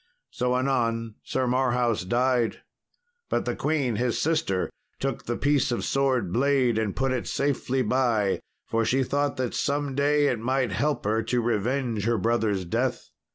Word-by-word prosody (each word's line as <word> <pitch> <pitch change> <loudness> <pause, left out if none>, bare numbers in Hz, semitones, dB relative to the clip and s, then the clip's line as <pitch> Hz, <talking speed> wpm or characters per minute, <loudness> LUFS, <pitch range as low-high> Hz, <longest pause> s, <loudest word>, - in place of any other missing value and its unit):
So 125 0 0
anon 115 -4 0
Sir 130 - -1
Marhaus 125 -4 +1
died. 120 +2 +1 0.7
But - - 0
the - - -1
queen, 140 -7 0
his 120 0 0
sister, 155 - 0 0.3
took 135 -2 -3
the 120 - -1
piece 145 -3 +2
of 120 - -1
sword 130 -9 +1
blade 130 -2 +2
and 105 -3 -1
put 135 0 0
it 130 -2 -2
safely 135 -2 0
by, 115 -4 +1 0.3
for 115 0 0
she 130 +4 +2
thought 145 +2 -1
that 130 -2 -2
some 145 -1 -1
day 145 +2 +3
it 125 -5 +1
might 130 0 0
help 120 +6 -1
her 110 +2 +1
to 120 +2 +1
revenge 120 0 0
her 115 0 +2
brother's 110 -5 0
death. 85 - -2
125 Hz, 160 wpm, -26 LUFS, 115-135 Hz, 0.7 s, day